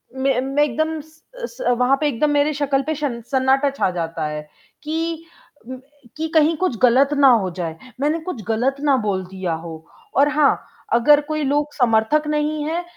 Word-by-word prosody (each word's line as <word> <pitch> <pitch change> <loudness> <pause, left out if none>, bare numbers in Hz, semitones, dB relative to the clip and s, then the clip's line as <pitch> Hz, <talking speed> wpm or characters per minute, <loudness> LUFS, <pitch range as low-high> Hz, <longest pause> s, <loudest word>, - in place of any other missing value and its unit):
मैं 265 -1 +1
मैं 275 +2 +1
एकदम 315 +4 -1
स 315 +1 -22 0.2
स 245 - -1
वहाँ 260 +2 +3
पे 300 - +2
एकदम 290 +3 0
मेरी 290 +1 +2
शक्ल 280 -1 0
पे 315 - 0
शन 275 -5 -3
सन्नाटा 265 +1 +2
छा 275 -8 0
जाता 165 -2 -3
है 150 0 -4 0.4
कि 325 +1 -3 0.9
कि 320 +1 -2
कहीं 315 +1 +4
कुछ 360 -12 -1
ग़लत 260 +3 +5
ना 280 -1 +6 0.2
हो 185 - -2
जाए। 165 -2 -4 0.2
मैंने 305 +3 +1
कुछ 320 -10 -6
ग़लत 250 +5 +1
ना 285 -2 +3
बोल 190 -2 -1
दिया 185 -2 -4
हो, 160 0 -8 0.3
और 285 +1 +4
हाँ 300 -1 +3 0.4
अगर 290 +5 +5
कोई 305 -1 -1
लोग 290 +2 0
समर्थक 245 +5 +2
नहीं 300 0 -1
हैं, 335 +3 -2
280 Hz, 180 wpm, -21 LUFS, 235-300 Hz, 0.9 s, ना